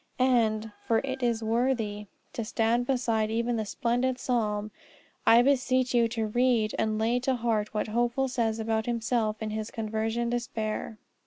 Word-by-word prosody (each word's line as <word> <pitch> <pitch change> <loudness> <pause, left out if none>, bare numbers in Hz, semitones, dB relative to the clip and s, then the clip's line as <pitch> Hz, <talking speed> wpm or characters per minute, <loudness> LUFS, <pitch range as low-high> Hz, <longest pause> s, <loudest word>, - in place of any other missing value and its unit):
And 225 -4 +2 0.2
for 225 - +3
it 265 -1 -4
is 235 -2 0
worthy 220 -3 0 0.3
to 230 - -3
stand 230 +2 0
beside 230 -5 +1
even 235 +2 0
that 220 - -2
splendid 245 +4 0
psalm, 215 -5 -1 0.6
I 235 +1 +7
beseech 255 -1 +2
you 235 -1 +4
to 225 -1 -2
read 230 -1 +2
and 220 -1 0
lay 230 +3 +1
to 260 +1 0
heart 225 -3 -1
what 210 - -1
Hopeful 240 +4 +1
says 230 -3 0
about 220 0 -1
himself 230 -2 -1
in 215 - -3
his 215 0 -3
conversion 225 +2 -2
despair. 225 -2 -3
230 Hz, 160 wpm, -28 LUFS, 220-245 Hz, 0.6 s, I